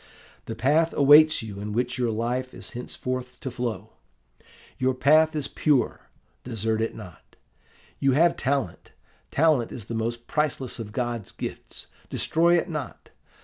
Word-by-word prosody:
'The 115 - -5
path 150 +8 +2
awaits 150 0 +6
you 100 -3 -7
in 105 +1 -5
which 125 +2 -1
your 120 -2 +1
life 120 +3 -2
is - - -6
henceforth 125 +1 -5
to 130 - -5
flow. 120 -2 -4 0.9
Your 130 0 +1
path 155 +4 +4
is 150 -2 -1
pure 145 -5 0 0.3
desert 110 -2 -1
it 115 - -2
not. 90 -2 -13 0.6
You 135 -1 +3
have 170 +5 +4
talent: 135 -9 -2 0.4
talent 150 -6 +2
is 115 - -8
the 115 - -6
most 115 +1 -3
priceless 140 -5 -1
of 110 -2 -6
God's 120 -3 -3
gifts - - -7 0.2
destroy 170 +2 +3
it 170 - -1
not. 150 -7 -6
125 Hz, 145 wpm, -25 LUFS, 115-150 Hz, 0.9 s, awaits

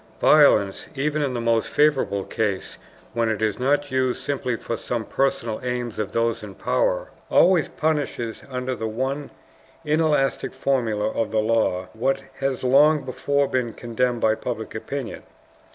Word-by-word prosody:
Violence, 110 -10 +4
even 150 +2 0
in 135 -3 -1
the - - -1
most 115 -1 +1
favorable 145 -9 +2
case, 100 -3 -3 0.3
when 115 -1 +1
it 110 -2 -1
is 110 0 0
not 145 +2 +1
used 130 -1 +1
simply 130 -3 -2
for 115 - -4
some 115 0 -3
personal 120 -5 -1
aims 125 -3 -3
of 105 -1 -2
those 115 0 0
in 100 -3 -9
power, - - 0 0.2
always 175 -3 +5
punishes 145 -7 -2
under 130 0 -3
the 110 -3 -3
one 130 +6 -3 0.6
inelastic 150 -4 +1
formula 120 -6 0
of 115 - -1
the 110 - -2
law 110 -4 +1
what 135 +4 0 0.2
has 135 -1 -1
long 145 +3 +5
before 140 +2 0
been 125 -4 -1
condemned 120 0 -1
by 110 - +4
public 110 0 -5
opinion. 120 +2 -5
125 Hz, 150 wpm, -23 LUFS, 110-140 Hz, 0.6 s, always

